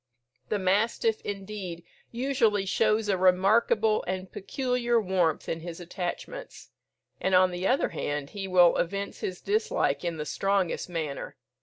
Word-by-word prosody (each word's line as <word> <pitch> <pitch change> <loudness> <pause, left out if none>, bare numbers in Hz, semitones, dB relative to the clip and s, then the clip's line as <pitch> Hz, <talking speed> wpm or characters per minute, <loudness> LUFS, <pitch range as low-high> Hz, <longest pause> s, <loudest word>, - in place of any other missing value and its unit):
The 210 - +1
mastiff, 210 +3 +1
indeed, 195 -4 -6 0.3
usually 235 -5 +1
shows 215 +2 +2
a 195 -3 +1
remarkable 210 +4 +3
and 185 0 -4
peculiar 240 +2 0
warmth 180 -6 0
in 165 - -2
his 170 +1 -7
attachments; 180 - -6 0.5
and, 190 0 +2
on 185 0 +5
the 180 +2 -2
other 260 - +2
hand, 145 -1 -3
he 195 -1 -5
will 180 -2 +5
evince 200 +3 -2
his 180 -1 -4
dislike 425 - 0
in 170 -2 -2
the 150 - -4
strongest 195 0 0
manner. 155 -5 -4
190 Hz, 140 wpm, -28 LUFS, 180-215 Hz, 0.5 s, on